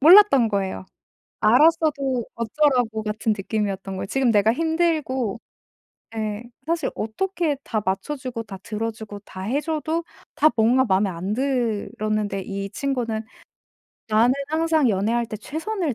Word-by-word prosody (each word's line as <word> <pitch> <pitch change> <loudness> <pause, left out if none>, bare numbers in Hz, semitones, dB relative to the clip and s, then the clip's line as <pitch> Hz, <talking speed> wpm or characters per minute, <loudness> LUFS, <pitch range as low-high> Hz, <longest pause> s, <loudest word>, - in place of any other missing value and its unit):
몰랐던 315 - +8
거예요. 195 - -2 0.6
알았어도 275 0 +3
'어쩌라고?' 235 -2 +1
같은 215 +1 0
느낌이었던 195 -1 -2
거예요. 190 - -4
지금 265 +2 +2
내가 210 +1 +4
힘들고 310 - 0 0.8
예 215 0 -3 0.2
사실 330 -3 0
어떻게 335 - -1
다 215 -2 -1
맞춰 195 +10 -1
주고 255 -4 -5
다 200 -3 -9
들어 220 +2 -3
주고 215 -2 -9
다 185 - -9
해 240 +9 0
줘도 320 +1 -2 0.3
다 305 - +5
뭔가 240 +4 +4
마음에 195 -2 +2
안 185 +4 -3
들었는데 215 -5 -1
이 195 +1 -4
친구는 240 -4 -2 0.9
'나는 225 +3 +4 0.2
항상 315 -3 +2
연애할 225 +4 +1
때 220 - -5
최선을 320 - -3
230 Hz, 290 characters per minute, -23 LUFS, 210-295 Hz, 0.9 s, 몰랐던